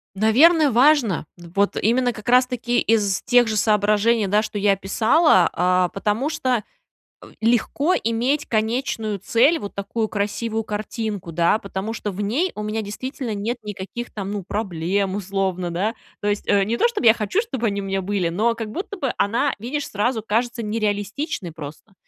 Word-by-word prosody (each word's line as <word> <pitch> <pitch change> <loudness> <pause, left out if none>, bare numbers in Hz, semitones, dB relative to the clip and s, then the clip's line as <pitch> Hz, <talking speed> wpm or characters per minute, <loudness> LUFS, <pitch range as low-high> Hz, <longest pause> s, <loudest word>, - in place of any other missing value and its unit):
Наверно, 290 - +5
важно. 245 - +3
Вот 175 +4 -1
именно, 245 +3 +2
как 215 +1 -10
раз 250 +1 +5
таки 245 -1 -1
из 205 -4 +1
тех 245 -2 +4
же 215 - -1
соображений, 210 +1 +2
да, 205 +2 +2
что 215 -1 -4
я 200 0 +3
описала, 200 - +3
а, 180 0 +2
потому 210 - -1
что, 255 -8 0 0.6
м, - - -14
легко 240 +9 +2
иметь 240 +6 0
конечную 220 -2 -1
цель, 270 - +3
вот 200 - -7
такую 205 +3 -2
красивую 220 +2 -2
картинку, 210 -3 -4
да. 170 +6 +2
Потому 200 +2 -5
что 210 -2 -4
в 195 +2 -5
ней 270 - 0
у 210 - -5
меня 215 +1 -2
действительно 240 +3 -5
нет 220 +5 -2
никаких 210 +3 -6
там, 200 -1 -5
ну, 205 -3 -4
проблем, 195 0 -2
условно, 190 -2 -2
да, 195 +7 -1 0.3
то 205 - 0
есть, 205 0 -2
э, 200 -1 +4
не 225 +4 -1
то - - +4
чтоб 470 - -4
я 225 -2 +8
хочу, 225 - 0
чтоб 265 - -6
они 200 -2 -1
у - - -6
меня 195 0 -1
были, 190 -2 -1
но 220 +7 +1
как 225 -2 -5
будто 395 - -5
бы 270 -7 -2
она, 235 +7 +1
видишь, 280 +6 -3
сразу 220 +2 -1
кажется 235 +2 -1
нереалистичной 210 - -2
просто. 155 +6 -10
215 Hz, 175 wpm, -22 LUFS, 200-240 Hz, 0.6 s, я